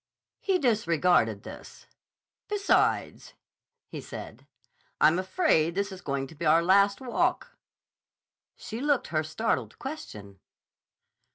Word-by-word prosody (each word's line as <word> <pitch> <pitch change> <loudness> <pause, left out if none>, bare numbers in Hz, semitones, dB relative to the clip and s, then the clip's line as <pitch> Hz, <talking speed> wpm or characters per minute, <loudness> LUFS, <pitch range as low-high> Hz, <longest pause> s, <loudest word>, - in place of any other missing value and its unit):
He 385 -2 +1
disregarded 175 - +2
this. - - -11 0.6
"Besides," 410 -1 0 0.5
he - - -7
said, - - -10 0.5
"I'm 155 +4 +4
afraid 185 - +1
this 200 +1 -1
is 190 -1 -9
going 140 -3 -2
to 135 - -13
be 160 - -8
our 165 +1 +4
last 200 +3 +3
walk." 250 -2 -1 1.0
She 225 +3 -7
looked 290 -2 +1
her 155 -1 0
startled 155 +9 -2
question. 105 - -8
185 Hz, 110 wpm, -27 LUFS, 155-245 Hz, 1.0 s, I'm